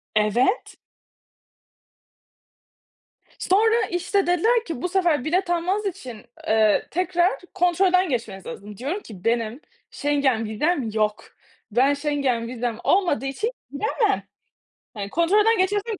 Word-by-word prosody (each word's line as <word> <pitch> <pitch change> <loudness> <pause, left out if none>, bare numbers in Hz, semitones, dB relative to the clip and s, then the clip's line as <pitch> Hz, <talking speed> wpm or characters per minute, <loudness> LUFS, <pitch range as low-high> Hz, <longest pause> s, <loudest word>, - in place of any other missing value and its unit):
Evet. 230 - +1 2.6
Sonra 445 +4 +3
işte 360 +2 0
dediler 445 +7 +2
ki 325 -8 -5
bu 360 - -1
sefer 340 -8 +1
bilet 360 +3 0
almanız 365 +5 0
için, 255 - -6 0.2
eee, 215 -1 +3
tekrar 360 +1 +1
kontrolden 360 0 +3
geçmeniz 225 -7 -4
lazım. 205 0 -9
Diyorum 295 - -3
ki 195 -5 -12
benim 230 +3 -1 0.3
Schengen 280 -6 0
vizem 250 +3 0
yok. 215 0 0 0.5
Ben, 265 +6 +3
Schengen 280 -5 -1
vizem 240 -2 -3
olmadığı 345 - +2
için 405 - -2 0.2
giremem. 415 - 0 0.7
Hani, 200 -2 -5
kontrolden 415 - +3
geçersem 410 +4 0
geri - - -19
305 Hz, 115 wpm, -23 LUFS, 235-375 Hz, 2.6 s, Sonra